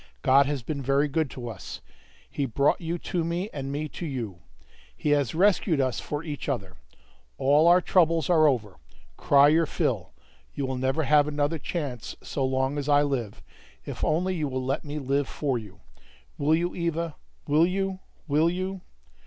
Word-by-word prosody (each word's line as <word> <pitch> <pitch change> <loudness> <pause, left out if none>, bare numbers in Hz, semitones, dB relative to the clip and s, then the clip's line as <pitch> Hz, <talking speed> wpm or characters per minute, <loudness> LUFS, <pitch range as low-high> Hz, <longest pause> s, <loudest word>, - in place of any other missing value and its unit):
God 135 +1 +5
has 140 -4 -2
been 140 +2 -4
very 140 +2 +2
good 150 0 0
to 125 -2 -7
us. 105 -6 -7 0.5
He 140 - -2
brought 140 +8 +1
you 170 +1 -2
to 175 0 -2
me, 175 +5 -2
and 135 -1 -4
me 150 +2 -2
to 175 - -6
you. 115 - -5 0.6
He 150 - 0
has 145 -2 +1
rescued 185 -3 +3
us 130 -2 0
for 150 +1 -4
each 150 -3 -5
other. 95 -9 -3 0.6
All 145 +4 +4
our 175 +1 +6
troubles 165 -5 +3
are 160 -3 +5
over; 110 -8 -1 0.4
cry 140 - +5
your 160 +1 +3
fill; - - -1 0.4
you 140 - -2
will 130 0 -3
never 135 +5 0
have 145 +1 +4
another 150 +2 -1
chance 140 -10 -4
so 140 - -3
long 130 +2 0
as 145 +1 -4
I 145 0 +5
live, 125 -8 -3 0.4
if - - -6
only 180 +4 +1
you 155 -4 -1
will 130 -1 -3
let 135 - -1
me 150 0 -5
live 140 0 0
for 135 -5 -1
you. 100 -5 -13 0.5
Will 150 +2 +2
you, 175 +2 -1
Eva? 170 -2 -2 0.3
Will 155 +4 +4
you? 190 0 -2 0.3
Will 155 +3 +3
you?" 185 +2 -3
145 Hz, 180 wpm, -26 LUFS, 135-165 Hz, 0.6 s, our